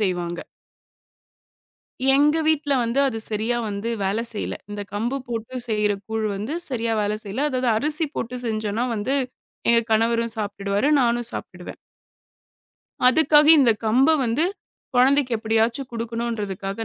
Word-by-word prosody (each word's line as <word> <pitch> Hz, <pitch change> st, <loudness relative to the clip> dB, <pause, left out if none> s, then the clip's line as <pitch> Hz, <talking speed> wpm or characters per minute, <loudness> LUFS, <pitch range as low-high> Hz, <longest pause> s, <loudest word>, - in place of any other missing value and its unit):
செய்வாங்க. 175 Hz, -3 st, -2 dB, 1.7 s
எங்க 295 Hz, +3 st, +4 dB
வீட்டுல 305 Hz, -2 st, +1 dB
வந்து 235 Hz, +3 st, -1 dB
அது 235 Hz, -4 st, -2 dB
சரியா 220 Hz, +3 st, -1 dB
வந்து 205 Hz, +2 st, -4 dB
வேல 195 Hz, +3 st, 0 dB
செய்யல. 210 Hz, -, -4 dB
இந்தக் 205 Hz, -1 st, -7 dB
கம்பு 235 Hz, +6 st, -1 dB
போட்டுச் 240 Hz, +1 st, -5 dB
செய்ற 210 Hz, -1 st, +1 dB, 0.2 s
கூழ் 220 Hz, 0 st, -1 dB
வந்து 215 Hz, +8 st, -4 dB, 0.2 s
சரியா 230 Hz, -4 st, -2 dB
வேல 205 Hz, +1 st, 0 dB
செய்யல. 235 Hz, +9 st, -2 dB
அதாவது, 255 Hz, -1 st, 0 dB
அரிசி 300 Hz, +6 st, +2 dB
போட்டுச் 245 Hz, +2 st, -4 dB
செஞ்சோனா 220 Hz, +1 st, -1 dB
வந்து, 225 Hz, +6 st, -1 dB, 0.5 s
எங்க 235 Hz, 0 st, +6 dB
கணவரும் 230 Hz, +1 st, +1 dB
சாப்ட்டுடுவாரு. 200 Hz, +3 st, -1 dB
நானும் 240 Hz, -1 st, +1 dB
சாப்பிடுவேன். -, -, -8 dB, 1.3 s
அதுக்காக, 295 Hz, +2 st, +5 dB
இந்தக் 235 Hz, -6 st, +3 dB
கம்ப 255 Hz, +6 st, +4 dB, 0.2 s
வந்து 240 Hz, +8 st, +1 dB, 0.5 s
குழந்தைக்கு 260 Hz, +1 st, +3 dB
எப்பிடியாச்சும் 225 Hz, +4 st, 0 dB
குடுக்கணுன்றதுக்காக 225 Hz, -3 st, -4 dB
230 Hz, 125 wpm, -23 LUFS, 210-255 Hz, 1.7 s, எங்க